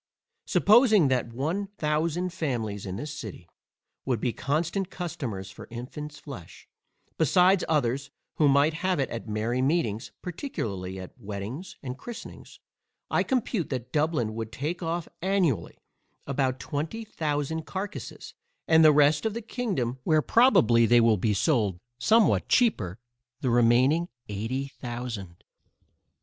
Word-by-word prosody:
Supposing 215 - +5
that 125 -3 0
one 160 - -2
thousand 165 +4 0
families 115 - -3
in 95 - -4
this 150 +8 -5
city, 105 - -8 0.6
would 125 -4 0
be 120 +1 -1
constant 165 +7 -1
customers 115 - -5
for 100 - -11
infants 145 +5 -7
flesh, 125 - -11 0.5
besides 180 +4 +4
others 140 -2 +1 0.3
who 150 - +4
might 140 +3 +4
have 185 +1 0
it 135 - -1
at 115 0 -5
merry 110 +4 -1
meetings, 130 -7 0
particularly 100 - -4
at 95 - -9
weddings 105 - -6
and 130 0 -6
christenings, 240 -2 -9 0.5
I - - +3
compute 235 -8 -1
that 125 -2 -4
Dublin 150 -8 +1
would 110 0 -5
take 150 +9 -3
off 165 0 -2
annually 175 - 0 0.5
about 130 -2 0
twenty 165 +11 -4
thousand 155 -3 -2
carcasses; 200 +2 -6 0.3
and 160 0 +6
the 155 - +8
rest 150 +1 +4
of 220 -1 -1
the 235 - -3
kingdom 180 - -2
(where 155 0 +3
probably 120 - +5
they 120 +1 +6
will 115 -1 +5
be 105 +2 +1
sold 105 - +1 0.2
somewhat 220 - +3
cheaper) 110 - +2 0.4
the 130 - +1
remaining 125 +8 +4 0.2
eighty 115 +7 -3
thousand. 120 -9 -7
140 Hz, 135 wpm, -27 LUFS, 115-170 Hz, 0.6 s, the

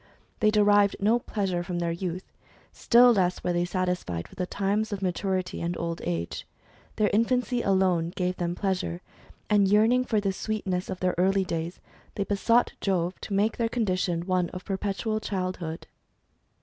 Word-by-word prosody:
They 215 - +4
derived 205 -1 +4
no 220 +4 +3
pleasure 195 -6 -2
from 175 0 -4
their 170 -1 -1
youth; 180 +1 -5 0.4
still 245 +1 +5
less 180 -4 0
were 180 - 0
they 175 0 +1
satisfied 180 - -2
with - - -16
the 180 - -1
times 205 +3 -1
of 200 -1 -4
maturity, 185 0 -1
and 170 +1 -2
old 170 0 -3
age. 85 -1 -3 0.5
Their 210 -1 +2
infancy 245 +2 +1
alone 185 -5 +2
gave 180 -1 -1
them 175 0 -2
pleasure, 185 -2 -2 0.4
and 205 -2 +4
yearning 220 +5 +4
for 220 -4 +1
the 195 -2 -1
sweetness 190 -3 -3
of 185 - -5
their 185 -1 +1
early 195 +1 +3
days, 165 0 -4 0.4
they 200 - 0
besought 230 +4 +2
Jove 180 -2 -1
to 205 - -5
make 210 +3 +1
their 230 -1 0
condition 185 -7 -1
one 180 -2 +1
of 185 - -8
perpetual 205 +2 -2
childhood. 185 -5 -4
190 Hz, 165 wpm, -27 LUFS, 180-210 Hz, 0.5 s, still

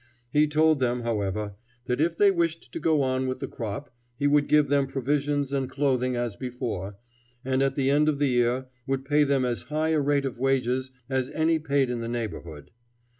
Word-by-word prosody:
He 150 +1 +4
told 155 0 +3
them, 125 -1 0
however, 105 -3 -2 0.3
that 125 +3 -1
if 165 +1 +1
they 205 -1 +6
wished 170 -2 -1
to - - -5
go 155 -2 +2
on 130 0 0
with 130 - -2
the - - -5
crop, 115 +3 -6 0.2
he 145 - -1
would 145 0 +3
give 150 -1 +4
them 140 0 +2
provisions 140 +1 -1
and 135 -2 -1
clothing 130 -3 0
as 120 -3 -2
before, 120 -7 -5 0.5
and 130 0 +1
at 135 0 +1
the 135 -1 +2
end 150 +2 +4
of 150 - 0
the 145 -1 +2
year 125 +1 +1 0.2
would 135 0 -1
pay 150 +1 +3
them 140 -2 +2
as 120 -1 -1
high 155 +1 0
a 160 -1 +2
rate 140 0 +1
of 130 -3 -4
wages 130 -1 +1 0.2
as 130 -1 -1
any 160 0 +2
paid 140 -4 +1
in 120 -1 -3
the 115 - -4
neighborhood. 85 -10 -5
135 Hz, 205 wpm, -26 LUFS, 125-145 Hz, 0.5 s, they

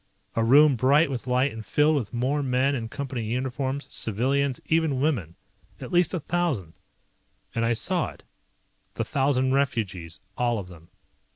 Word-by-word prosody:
A 115 - +2
room 140 +4 +6
bright 140 +5 +3
with 130 -1 -5
light 130 +2 +2
and 110 0 -7
filled 150 +7 +2
with 125 -8 -2
more 130 +5 0
men 130 +1 +1
in 115 -4 -3
Company 135 -2 -4
uniforms, 130 +4 -2
civilians, 130 +5 0
even 160 -5 +1
women. 120 - -1 0.4
At - - -8
least 175 0 +3
a - - -1
thousand. 155 - -2 0.8
And 115 - -1
I 115 +1 +2
saw 115 - 0
it. - - -15 0.7
The - - -2
thousand 135 -1 +1
refugees, 100 - -1 0.2
all 120 -1 0
of 95 -3 -6
them. 85 -2 -15
130 Hz, 160 wpm, -26 LUFS, 115-140 Hz, 0.8 s, room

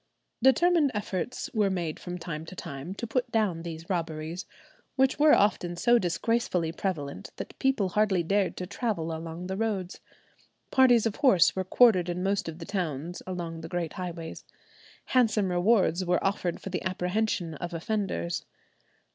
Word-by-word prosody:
Determined 320 +3 +4
efforts 205 +2 -3
were 210 -3 +2
made 175 -5 -2
from 180 0 -6
time 165 -3 -5
to 185 - -9
time 165 +2 -6
to 235 - -4
put 245 +2 -1
down 205 -7 +1
these 165 0 -7
robberies, 165 -1 -3 0.5
which 265 +1 +2
were 300 0 +7
often 180 -4 +1
so 240 +7 +4
disgracefully 180 -2 0
prevalent 165 -6 -4
that - - -8
people 265 -8 +2
hardly 195 -2 +2
dared 195 +2 +1
to 180 - -3
travel 180 -5 -2
along 165 +2 -6
the 190 +1 -3
roads. 195 -4 -2 0.7
Parties 245 -4 +5
of 225 -2 -1
horse 255 - +5
were 190 - 0
quartered 185 -3 +4
in 175 +1 -2
most 195 -2 0
of 160 - -8
the 165 - -8
towns 170 -3 -3
along 170 -3 -4
the 165 - -7
great 175 -2 -2
highways. 170 -3 -6 0.6
Handsome 215 -6 +2
rewards 185 0 +3
were 180 +1 +1
offered 185 -3 -1
for 195 - -7
the 180 - -2
apprehension 185 -1 -1
of 175 +4 -5
offenders. 175 - -2
185 Hz, 160 wpm, -28 LUFS, 170-215 Hz, 0.7 s, were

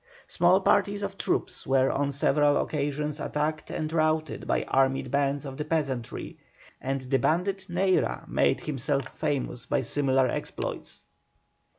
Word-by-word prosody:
Small 180 +2 +3
parties 205 +1 +2
of 200 -1 -3
troops - - -2
were 135 0 +3
on 140 0 0
several 145 +1 +3
occasions 150 0 -2
attacked 155 +2 -2
and 155 0 -3
routed 155 -1 0
by - - +1
armed 135 -1 +1
bands 140 +1 +1
of 135 -1 -7
the 150 - -2
peasantry, 140 -7 -3 0.4
and 135 +1 -2
the 130 +1 0
bandit 190 +4 0
Neyra 185 +2 +1
made - - +2
himself 140 -2 -2
famous 130 -4 -2
by - - +1
similar 130 0 +2
exploits. - - -5
145 Hz, 135 wpm, -27 LUFS, 135-160 Hz, 0.4 s, Small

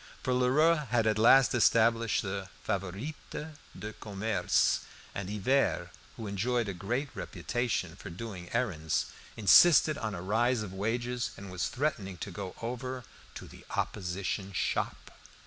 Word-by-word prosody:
For 130 - +1
Lheureux 150 +5 +3
had 120 -2 +2
at 110 -1 +2
last 130 +4 +6
established 115 -1 +3
the 95 -1 -4
"Favorites 100 - -3 0.6
du 105 +1 -6
Commerce," 105 -2 +1 0.3
and 100 -1 -4
Hivert, 105 -3 +1 0.3
who 115 - -6
enjoyed 110 +4 0
a 100 - -2
great 120 +10 -2
reputation 120 -9 -2
for - - -9
doing 90 0 -7
errands, 85 -11 -1 0.3
insisted 150 - +7
on 110 -2 -3
a 85 - -5
rise 115 +4 +2
of 95 -3 -7
wages, 120 +5 -1
and 100 -1 -9
was 90 -2 -1
threatening 110 -10 -2
to 100 - -6
go 95 0 -6
over 125 +2 -4 0.3
"to - - -8
the - - -14
opposition 95 +1 -2
shop." - - -2
110 Hz, 140 wpm, -30 LUFS, 95-125 Hz, 0.6 s, insisted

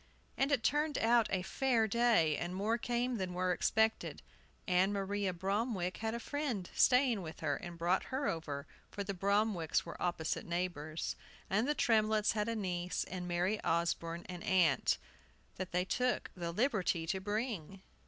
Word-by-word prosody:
And 275 +2 +1
it 265 -5 +2
turned 295 +3 +1
out 230 0 +4
a 190 -2 0
fair 235 +1 +1
day, 220 -9 +3
and 175 +4 -3
more 215 +5 0
came 240 +1 0
than 185 -3 -3
were 185 0 +1
expected. 220 +5 +1 0.4
Ann 185 +2 +3
Maria 200 -1 -1
Bromwick 190 +1 -1
had 220 +1 -2
a - - -3
friend 250 -9 -3
staying 250 -4 +4
with 160 -2 -8
her, 145 -3 +1
and 175 -1 -8
brought 175 +3 +1
her 275 +2 -2
over, 145 -4 -3 0.2
for 200 - -4
the 200 0 -3
Bromwicks 200 -3 +1
were 170 - -8
opposite 170 -3 -1
neighbors. 170 -3 -2 0.4
And 210 +6 +2
the 295 - +1
Tremletts 215 -3 +3
had 210 0 -1
a 230 - -1
niece, 180 -4 -2
and 180 -1 -5
Mary 180 +5 0
Osborne 170 0 0
an 180 -1 -7
aunt, 175 -7 +3 0.6
that 185 -1 -4
they 180 +1 +1
took 250 +5 0
the 170 -2 -3
liberty 190 -6 +1
to 190 +3 -1
bring. 200 -3 -3
195 Hz, 165 wpm, -34 LUFS, 175-225 Hz, 0.6 s, out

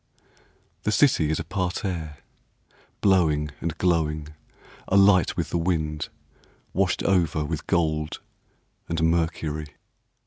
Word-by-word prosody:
/ - - -37
The 105 - 0
city 110 - +3
is 80 - 0
a - - -2
parterre, 90 -3 -3 0.8
Blowing 80 -7 +3
and 85 -1 -3
glowing, 75 -4 0 0.6
Alight 95 -2 +4
with - - -2
the 85 - 0
wind, 80 -3 -1 0.6
Washed 95 -1 +1
over 85 -5 +2
with - - -4
gold 80 -3 0 0.7
and 80 - -1
mercury. 80 -3 -1
80 Hz, 110 wpm, -25 LUFS, 75-90 Hz, 0.8 s, Alight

